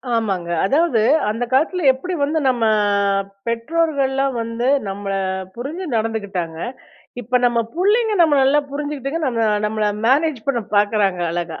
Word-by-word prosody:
ஆமாங்க. 195 -6 -1 0.2
அதாவது 295 - +2 0.3
அந்த 225 +3 -2
காலத்தில 325 +5 +1
எப்படி 360 +8 -6
வந்து 310 +3 0
நம்ம 245 -3 +1 0.8
பெற்றோர்கள்லாம் 275 +1 0
வந்து 230 +2 -3 0.2
நம்மள 195 0 -4 0.4
புரிஞ்சு 295 +10 -5
நடந்துக்கிட்டாங்க. 200 -7 -3 0.7
இப்ப 250 +2 +1
நம்ம 235 -1 +1
புள்ளைங்க 420 +5 +2
நம்மள 300 -4 +4
நல்லா 290 +2 +3
புரிஞ்சுகிட்டுங்க 290 +1 -3
நம்ம 230 -3 +1 0.2
நம்மள 215 0 -1 0.2
மேனேஜ் 280 -2 +1
பண்ண 240 -4 +1
பார்க்குறாங்க 205 -3 +2
அழகா! 170 -2 -4
250 Hz, 125 wpm, -20 LUFS, 215-295 Hz, 0.8 s, நம்மள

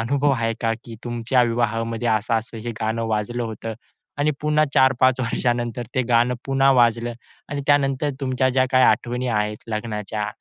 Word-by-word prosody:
अनुभव 140 +5 +1
आहे 115 -3 0
का, 115 -1 +1
की 115 -1 -9
तुमच्या 120 +1 +1
विवाहामध्ये 115 0 -1
असं-असं 115 +1 -1
हे 120 - -2
गाणं 110 +1 -1
वाजलं 110 +3 -1
होतं 115 0 -5 0.4
आणि 150 +1 +2
पुन्हा 150 0 +2
4-5 130 -1 +4
वर्षानंतर 120 -1 -1
ते 130 - +2
गाणं 120 +1 +3
पुन्हा 135 0 +3
वाजलं 120 0 +2 0.4
आणि 145 0 -3
त्यानंतर 145 0 +2
तुमच्या 130 -1 +1
ज्या 130 0 +3
काही 130 0 +5
आठवणी 125 +1 +1
आहेत 105 -2 -1
लग्नाच्या, 105 -1 -3
120 Hz, 155 wpm, -22 LUFS, 115-130 Hz, 0.4 s, काही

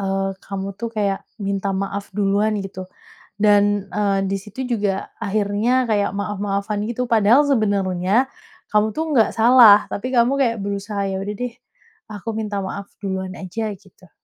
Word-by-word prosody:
eee, 195 0 -1
kamu 195 0 -5
tuh 235 - -3
kayak 200 -2 0 0.2
minta 200 -1 -2
maaf 195 +1 -3
duluan, 205 +1 +1
gitu? 190 -1 -7 0.5
Dan, 205 -1 +3
eee, 200 -2 +1
di 195 - 0
situ 210 +6 -7
juga, 200 -2 -2
akhirnya 215 +4 +1
kayak 205 -2 +1
maaf-maafan 205 0 -2
gitu. 240 +1 -2
Padahal 230 +4 +5
sebenarnya, 200 -2 +1 0.4
kamu 210 0 +3
tuh 320 - 0
nggak 225 -4 +4
salah. 225 -3 +7
Tapi 205 - -3
kamu 240 +1 +4
kayak 235 -4 +2
berusaha, 200 0 -3
"Ya 190 0 -2
udah 205 +2 -4
deh, 245 0 -4 0.6
aku 210 +1 -8
minta 210 -2 -2
maaf 200 +1 -6
duluan 190 -1 -3
aja," 215 +4 -4
gitu. 185 -2 -22
205 Hz, 150 wpm, -21 LUFS, 195-220 Hz, 0.6 s, salah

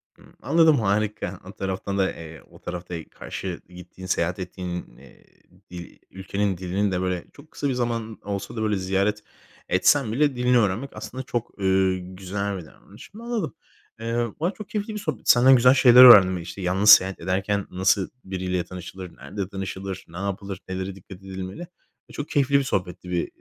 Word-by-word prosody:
Hıı. - - -20 0.2
Anladım, 160 -4 +4
harika. 105 -2 -1
O 95 - -9
taraftan 95 +1 -4
da, 95 -1 +2
eee, 80 -3 -10
o - - -16
tarafta 90 0 -6
karşı 90 -3 -6
gittiğin, 90 +1 -12
seyahat 90 0 0
ettiğin, 90 -1 -6
iii, - - -18 0.5
dil 85 -1 -9
ülkenin 95 0 -2
dilini 95 +3 -1
de 90 -1 -1
böyle 90 -2 -2
çok 145 +2 -17
kısa 145 - -2
bir 130 - 0
zaman 115 -3 -3
olsa 100 +1 -5
da, 110 - -3
böyle, 105 -2 +1
ziyaret 100 +3 0 0.5
etsem 110 +6 +3
bile 145 +2 +1
dilini 125 0 +3
öğrenmek 110 +4 0
aslında 130 +1 -6
çok, 120 -2 -3
eee, 95 -1 +2
güzel 95 +2 -4
bir 90 - -8
davranış. 100 - -16
Anladım. 235 -6 -3 0.4
Eee, 115 +1 -1
valla 170 +4 0
çok 215 - -10
keyifli 210 +1 -3
bir 210 - -4
sohbetti, 155 - +2
senden 130 +2 +6
güzel 125 +1 +6
şeyler 125 -2 +8
öğrendim: 95 -7 +9
İşte, 85 +3 -8
yalnız 95 +4 +2
seyahat 95 -1 +7
ederken 95 +3 -1
nasıl 95 +1 +1
biriyle 90 -1 -2
tanışılır, 90 0 -9
nerede 95 +8 -5
tanışılır, 95 -1 -6
ne 85 - -11
yapılır, 100 0 -4
nelere 95 +1 -4
dikkat 95 0 -12
edilmeli 95 - -7 0.5
ve - - -14
çok 145 - -5
keyifli 140 0 +3
bir - - -1
sohbetti 90 -6 -3
be 85 - 0
95 Hz, 175 wpm, -24 LUFS, 95-115 Hz, 0.5 s, öğrendim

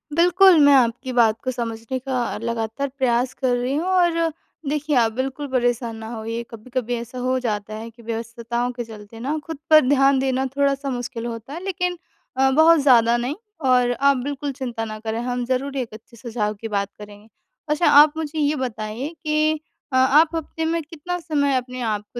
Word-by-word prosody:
बिल्कुल 355 0 +6
मैं 285 - +7
आपकी 250 +1 +1
बात 225 -2 +3
को 255 - -1
समझने 230 +1 -4
का 250 -3 -2
लगातार 230 +3 -2
प्रयास 250 -1 +1
कर 250 -2 0
रही 250 +3 -1
हूँ 320 +4 -1
और 340 -3 +2 0.4
देखिए 295 0 -1
आप 225 -2 +3
बिल्कुल 265 +4 -3
परेशान 240 -2 0
ना 220 0 -8
होइए। 230 +1 -4
कभी-कभी 245 +1 -4
ऐसा 235 +2 -7
हो 255 +1 0
जाता 215 -3 -3
है 225 +2 -7
कि 230 +1 -18
व्यस्तताओं 235 +2 -3
के 240 -1 -5
चलते 220 0 -12
ना 285 +6 -2
खुद 325 -3 -6
पर 310 -1 +8
ध्यान 275 -1 +4
देना 265 0 0
थोड़ा-सा 280 0 +1
मुश्किल 245 -2 -4
होता 235 +3 -6
है 345 +3 -7
लेकिन 360 -2 -2 0.4
अ, 265 0 +4
बहुत 320 +3 +6
ज़्यादा 240 -3 +5
नहीं। 250 +5 -2 0.3
और 250 -1 +3
आप 275 +2 +3
बिल्कुल 280 +2 -3
चिंता 240 -4 -4
ना 215 0 -6
करें, 220 +1 -3
हम 245 0 -2
ज़रूर 260 +2 -2
एक 240 -4 -4
अच्छे 225 +2 -14
सुझाव 220 -2 -2
की 225 - -4
बात 200 -1 -1
करेंगे। 210 +1 -12 0.4
अच्छा 300 +3 +2
आप 295 +1 +7
मुझे 310 0 -3
ये 295 +1 +2
बताइए 235 +1 -4
कि 305 0 +2 0.4
अ, - - +1
आप 295 +6 +4
हफ़्ते 320 0 -3
में 330 +1 0
कितना 335 +3 -5
समय 290 -5 0
अपने 250 0 -5
आपको 215 +1 -3
255 Hz, 190 wpm, -22 LUFS, 230-290 Hz, 0.4 s, पर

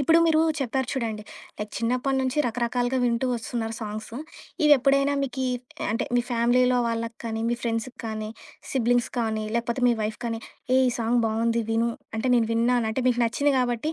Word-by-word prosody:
ఇప్పుడు 325 +4 +5
మీరూ 320 -1 +4 0.2
చెప్పారు 265 -1 -1
చూడండి 225 -5 -2 0.4
లైక్ 210 0 -4
చిన్నప్పడి 250 +3 0
నుంచి 260 +2 -1
రకరకాలుగా 245 +2 0
వింటూ 235 +1 +1
వస్తున్నారు 225 -1 -3
సాంగ్సు. 215 +2 -6 0.5
ఇవెప్పుడైనా 275 -1 +5
మీకి 265 0 -2 0.5
అంటే 225 - 0
మీ - - +4
ఫ్యామిలీలో 245 +1 +3
వాళ్ళకి 230 0 -3
కానీ, 225 -1 -3
మీ 240 - +1
ఫ్రెండ్స్‌కి 235 +2 -2
కానీ, 215 -1 -4 0.4
సిబ్లింగ్స్ 245 -2 +2
కానీ, 220 -2 -1
లేకపోతే 235 +2 -1
మీ 240 - +5
వైఫ్ 215 0 -3
కానీ 230 -1 -2 0.4
ఏయ్! 260 - +5
ఈ - - +2
సాంగ్ 235 +1 +2
బావుంది 230 +1 +1
విను 230 +1 +2 0.3
అంటే 255 +4 -1
నేను 230 -2 +3
విన్నాను. 235 0 +2
అంటే 255 +4 -1
మీకు 245 -1 +1
నచ్చింది 285 +5 +2
గాబట్టి 250 +5 0
235 Hz, 170 wpm, -25 LUFS, 225-255 Hz, 0.5 s, ఇప్పుడు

